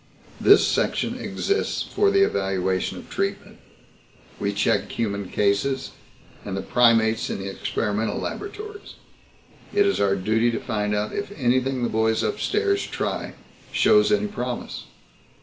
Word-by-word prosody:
This -, -, +6 dB
section -, -, 0 dB
exists 405 Hz, -, -1 dB
for 410 Hz, -1 st, +1 dB
the 395 Hz, -1 st, +4 dB
evaluation 95 Hz, -, 0 dB
of -, -, -10 dB
treatment. 195 Hz, +1 st, -3 dB, 0.8 s
We 100 Hz, -, 0 dB
check 100 Hz, +1 st, +1 dB
the -, -, -9 dB
human 100 Hz, -4 st, -2 dB
cases, 105 Hz, +7 st, 0 dB, 0.5 s
and 95 Hz, -1 st, -4 dB
the 95 Hz, -, -3 dB
primates 115 Hz, -2 st, +3 dB
in -, -, -2 dB
the 95 Hz, 0 st, -5 dB
experimental 105 Hz, +2 st, -2 dB
laboratories. 415 Hz, +1 st, -6 dB, 0.8 s
It 410 Hz, 0 st, +3 dB
is 395 Hz, -, +1 dB
our 100 Hz, -1 st, +3 dB
duty 110 Hz, +5 st, +1 dB
to -, -, -1 dB
find 105 Hz, -3 st, -1 dB
out 105 Hz, +1 st, -2 dB
if 200 Hz, 0 st, -4 dB
anything 130 Hz, -1 st, +1 dB
the 120 Hz, -, +1 dB
boys 110 Hz, 0 st, +1 dB
upstairs 400 Hz, -1 st, 0 dB
try -, -, -3 dB, 0.4 s
shows 210 Hz, -1 st, +4 dB
any 210 Hz, 0 st, +2 dB
promise. 125 Hz, -12 st, -5 dB
115 Hz, 140 wpm, -24 LUFS, -, 0.8 s, This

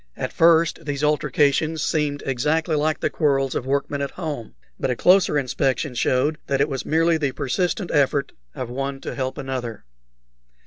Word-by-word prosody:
At -, -, -4 dB
first 165 Hz, 0 st, +4 dB
these 145 Hz, -1 st, -3 dB
altercations 150 Hz, +1 st, +1 dB
seemed 150 Hz, -2 st, -1 dB
exactly 150 Hz, +5 st, 0 dB
like 155 Hz, +1 st, 0 dB
the -, -, +1 dB
quarrels 135 Hz, -3 st, +1 dB
of 130 Hz, -, -3 dB
workmen 140 Hz, +1 st, -1 dB
at 140 Hz, -, -1 dB
home, 145 Hz, -, -6 dB, 0.2 s
but -, -, -1 dB
a 125 Hz, -, 0 dB
closer 180 Hz, 0 st, +4 dB
inspection 135 Hz, +1 st, 0 dB
showed 130 Hz, +5 st, +1 dB
that 135 Hz, -1 st, 0 dB
it 140 Hz, -, +3 dB
was 135 Hz, -2 st, -4 dB
merely 165 Hz, +1 st, +2 dB
the 140 Hz, -4 st, -1 dB
persistent 180 Hz, -, -1 dB
effort 140 Hz, -1 st, +2 dB, 0.2 s
of 125 Hz, -, -4 dB
one 135 Hz, +1 st, -3 dB
to -, -, -5 dB
help 130 Hz, -1 st, -3 dB
another. 130 Hz, -5 st, -5 dB
145 Hz, 170 wpm, -23 LUFS, 135-155 Hz, 0.2 s, first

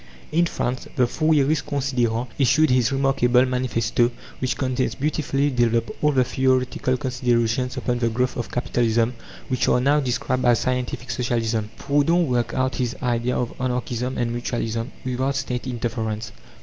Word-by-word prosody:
In 170 Hz, +2 st, +3 dB
France, 125 Hz, -5 st, -3 dB
the 130 Hz, -3 st, +4 dB
Fourierist 155 Hz, +2 st, +1 dB
Considérant 125 Hz, -4 st, 0 dB
issued 155 Hz, +3 st, +4 dB
his 125 Hz, -1 st, +3 dB
remarkable 135 Hz, -2 st, +3 dB
manifesto, 120 Hz, -2 st, +1 dB, 0.3 s
which 130 Hz, -, -1 dB
contains, 130 Hz, -1 st, -1 dB
beautifully 145 Hz, -1 st, 0 dB
developed, 115 Hz, -2 st, +1 dB
all 150 Hz, -, +4 dB
the 130 Hz, -3 st, +3 dB
theoretical 130 Hz, 0 st, +1 dB
considerations 125 Hz, -1 st, 0 dB
upon 120 Hz, -1 st, -1 dB
the 115 Hz, -1 st, +1 dB
growth 125 Hz, +3 st, -1 dB
of 120 Hz, -, -4 dB
Capitalism, 120 Hz, -1 st, +1 dB, 0.3 s
which 130 Hz, -3 st, 0 dB
are -, -, +4 dB
now 140 Hz, +4 st, +3 dB
described 130 Hz, -1 st, -1 dB
as 120 Hz, -2 st, +5 dB
"Scientific 125 Hz, -1 st, -2 dB
Socialism." 115 Hz, -2 st, -1 dB
Proudhon 155 Hz, +5 st, +2 dB
worked 125 Hz, -4 st, -1 dB
out 130 Hz, 0 st, +1 dB
his 125 Hz, -1 st, -1 dB
idea 120 Hz, 0 st, 0 dB
of 120 Hz, -, -2 dB
Anarchism 125 Hz, 0 st, -2 dB
and 120 Hz, -1 st, 0 dB
Mutualism, 115 Hz, -1 st, -2 dB, 0.2 s
without 130 Hz, +2 st, -1 dB
State 125 Hz, -2 st, -3 dB
interference. 110 Hz, -3 st, -3 dB
125 Hz, 150 wpm, -23 LUFS, 120-130 Hz, 0.3 s, as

